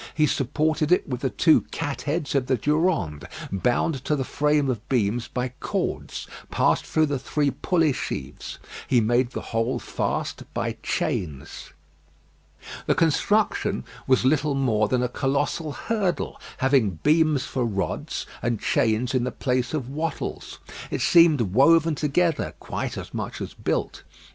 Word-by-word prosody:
He 155 - +4
supported 155 +3 0
it 180 - +3
with 125 -3 -4
the 135 - +1
two 160 +3 +4
cat 145 -4 -3
heads 150 0 -2
of 135 -3 +1
the 130 -1 +2
Durande, 150 - 0 0.2
bound 125 - 0
to 150 - +2
the 135 - -1
frame 150 +1 +1
of 120 -4 -3
beams 120 -1 +1
by 125 0 -2
cords - - -3 0.2
passed - - +2
through 155 0 +3
the 145 -3 -2
three 145 +2 0
pulley 165 -3 +1
sheaves. 70 - -5 0.3
He 125 - +4
made 120 +2 +2
the - - -5
whole 115 +3 +1
fast - - -3
by - - -2
chains. 75 -6 -3 1.1
The - - +3
construction 200 +7 +1 0.2
was 130 -1 +3
little 145 +1 +2
more 110 -6 +2
than 125 +2 +1
a - - +2
colossal 140 +5 -1
hurdle, 205 -3 -2 0.2
having 130 - +2
beams 155 -2 +3
for 130 - -2
rods 100 -4 -2 0.2
and 120 -3 -1
chains 120 -1 +1
in 130 -2 +2
the 125 - -1
place 125 -2 -1
of 145 -6 -2
wattles. 155 +5 -4 0.3
It - - -2
seemed 165 -6 +6
woven 150 - +4
together, 155 +2 0
quite - - -4
as - - -7
much - - -4
as - - -5
built. - - -2
135 Hz, 150 wpm, -25 LUFS, 120-155 Hz, 1.1 s, seemed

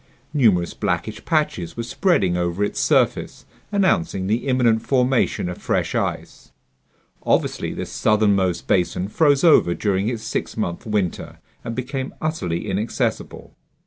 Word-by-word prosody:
Numerous 105 - +3
blackish - - -3
patches 150 - -1
were 115 - -2
spreading 115 - +1
over 90 +2 -1
its 105 - -2
surface, - - +1 0.3
announcing 175 - +1
the 110 +7 -1
imminent 120 -4 +3
formation 130 -7 +1
of 90 - -6
fresh - - -1
ice. - - -4 0.7
Obviously - - 0
this - - -6
southernmost 100 -4 +1
basin 90 +1 0
froze 145 +4 +3
over 150 - +5
during 100 0 0
its 115 -3 -4
six - - -4
month 85 +5 -3
winter 105 -5 -2 0.3
and 115 -1 -5
became 130 +2 -4
utterly 100 - -2
inaccessible. 105 +3 -3
110 Hz, 130 wpm, -22 LUFS, 95-130 Hz, 0.7 s, over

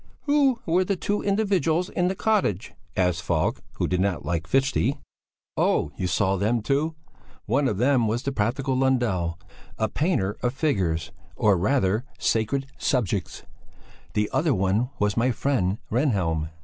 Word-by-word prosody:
"Who 285 -4 +3
were 175 +3 +3
the 195 +2 0
two 205 +3 -1
individuals 195 -5 +1
in 180 - 0
the 190 - -1
cottage?" 190 - 0 0.2
asked 90 -2 +1
Falk, 85 -3 0
who - - -1
did 90 0 0
not 95 -6 -1
like 85 +2 -2
Fichte. 135 - +1 0.6
"Oh. - - +1
You 95 - -2
saw 95 +3 +1
them 110 +4 0
too? 150 +6 0 0.5
One 135 +5 +2
of 105 - -1
them 125 0 +3
was 115 +4 -1
the 140 - -1
practical 130 +3 0
Lundell, 120 -11 +1 0.4
a 110 - +1
painter 110 - 0
of 125 +1 -1
figures, 85 - 0 0.2
or 105 -1 +3
rather, 105 +2 +1
sacred 115 +5 0
subjects; 105 -7 -1 0.7
the 105 0 +2
other 155 -4 +2
one 95 +6 +1
was 105 0 +1
my 120 +2 +2
friend 115 -6 0
Rehnhjelm." 95 - +1
120 Hz, 150 wpm, -25 LUFS, 95-145 Hz, 0.7 s, Who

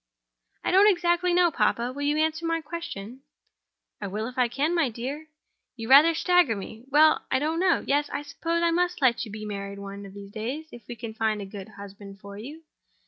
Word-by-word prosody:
"I - - 0
don't 390 +3 +7
exactly 350 -1 +2
know, 350 -1 +4
papa. 245 -3 0
Will 285 - -7
you 290 +1 +1
answer 315 +1 0
my 330 0 0
question?" 270 -8 -7 0.8
"I 200 - -3
will 210 +3 -3
if 250 +1 -7
I 250 -2 +3
can, 285 +8 -1
my 330 -6 +2
dear; 265 +7 -6 0.5
you 225 -2 -6
rather 310 +5 +8
stagger 355 -8 +3
me. 220 +4 -9
Well, 310 +2 +5
I - - +2
don't 310 +4 -1
know. 365 -2 +2
Yes; 290 +1 +1
I 290 - -3
suppose 330 +4 -2
I 340 - +3
must 355 +1 0
let 250 -4 +2
you 215 - -10
be 215 0 -7
married 200 -1 -5
one 200 0 -8
of 195 - -14
these 200 0 -10
days—if 240 +3 -6
we 240 - -6
can 225 -1 -7
find 220 -1 0
a 200 - -5
good 195 +1 -9
husband 200 -1 -11
for 200 +1 -10
you. 285 +10 -9
265 Hz, 210 wpm, -26 LUFS, 215-325 Hz, 0.8 s, rather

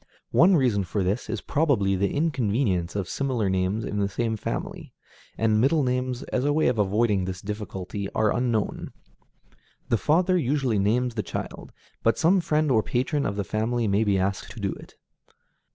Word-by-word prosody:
One 185 +2 +5
reason 120 - +2
for 95 +2 -2
this 100 +6 -2
is - - -3
probably 135 -11 +1
the 100 +1 0
inconvenience 115 - 0
of 100 -3 -2
similar 125 -8 -1
names 95 +4 0
in 105 - -3
the 100 0 +1
same 110 +3 -1
family, 105 - -5 0.4
and 110 -1 +2
middle 145 +4 +3
names, 125 0 -1
as 130 - +1
a 145 - +2
way 155 -1 +3
of 120 -3 -1
avoiding 105 -1 +2
this 90 -1 -5
difficulty, 100 -1 -5
are 110 -1 +2
unknown. 120 -4 -1 1.0
The 115 - +3
father 180 +4 +2
usually 130 -6 0
names 120 +5 +1
the 110 - -1
child, - - -6 0.3
but 115 - +2
some 180 +3 +3
friend 155 -2 +1
or 110 -3 +4
patron 130 +6 -1
of 100 - -3
the 100 - -1
family 110 +3 -1
may 100 +2 +2
be 100 -3 +2
asked 95 +1 -2
to 120 - -10
do 100 -2 -1
it. - - -14
110 Hz, 180 wpm, -25 LUFS, 100-130 Hz, 1.0 s, One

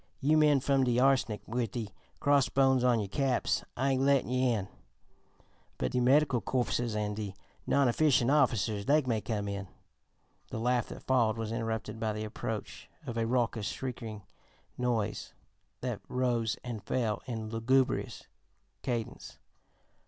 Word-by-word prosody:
You 150 +3 +3
men 150 -3 +5
fum 135 0 +2
de 125 -1 +2
Arsenic 130 -5 +2
wid 120 0 -1
de 115 -4 -3 0.3
crossbones 135 -2 +3
on 125 -2 +4
you 105 - -2
caps, 130 +4 0
I 135 +2 +1
ain't 130 0 +1
lettin' 140 -2 +3
you 130 0 +1
in; 105 -5 -1 1.1
but - - -1
de 125 - +1
Medical 130 0 +4
Corpses 120 0 -1
an' 105 -1 -1
de 105 -2 -5 0.3
Non 140 -2 +3
efficient 130 -1 +3
Officers, 115 -8 +2
dey 150 +4 +4
may 115 -4 0
come.'" 100 -1 -3 0.8
The - - -5
laugh 125 0 +1
that - - -9
followed 120 -4 +2
was 110 -1 -3
interrupted 110 -2 -3
by 110 -1 -1
the 105 0 -4
approach 95 -9 -6 0.2
of 120 -4 -5
a 115 -1 0
raucous, 115 -3 0
shrieking 115 -5 -5 0.5
noise 115 -4 -2 0.5
that - - -3
rose 120 -3 0
and 115 -5 -5
fell 110 -2 -1
in 110 -3 -4
lugubrious 125 +3 +1 0.6
cadence. 120 -3 -4
120 Hz, 145 wpm, -31 LUFS, 110-130 Hz, 1.1 s, men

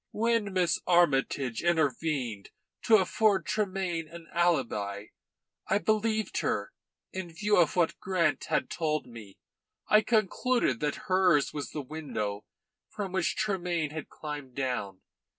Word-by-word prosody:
"When 230 -2 +1
Miss 180 -2 +1
Armytage 135 -7 +2
intervened 145 - 0 0.4
to 225 - +7
afford 200 -1 +3
Tremayne 185 -5 -1
an 165 +1 -11
alibi, 115 - 0 0.6
I - - +3
believed 215 +1 0
her, - - -1 0.4
in 185 -2 -5
view 205 +5 +1
of 170 -4 +3
what 175 -2 +1
Grant 170 -5 0
had - - -1
told 155 -2 -1
me; 110 -5 -12 0.5
I 215 - +6
concluded 220 - +1
that 150 -1 -2
hers 185 -6 +3
was 145 -1 -4
the 150 - -5
window 110 -9 -4 0.4
from 205 -3 -5
which 185 -2 0
Tremayne 175 -7 -1
had 155 -1 -6
climbed 145 -4 -7
down. 110 -8 -3
170 Hz, 130 wpm, -29 LUFS, 135-190 Hz, 0.6 s, to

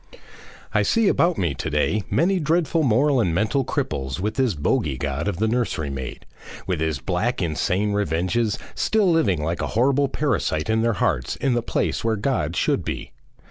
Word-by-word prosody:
I - - +3
see 230 -2 +2
about 170 -2 +2
me 85 -6 0
to 65 - -4
day 80 +8 +1
many 185 +3 +2
dreadful 165 0 +1
moral 135 +1 +3
and 90 -8 +1
mental 110 +8 +1
cripples 70 - -3
with 105 +4 -1
this 130 -7 +1
bogey 75 -1 0
God 70 +5 -2
of 100 - -1
the 110 +4 +1
nursery 110 - -1
maid, 65 -2 -6 0.4
with 90 -4 -1
his 80 -2 0
black, 90 - -1
insane 90 +5 0
revenges, 100 +4 0 0.2
still 210 -5 +2
living 100 - +2
like 85 +2 -2
a - - -1
horrible 140 +3 +3
parasite 120 - -1
in 110 0 +2
their 115 0 +2
hearts 70 -10 0
in 135 -2 0
the 120 - +1
place - - -1
where 115 -1 +1
God 100 - -1
should - - +1
be. - - -5
105 Hz, 180 wpm, -23 LUFS, 80-135 Hz, 0.4 s, I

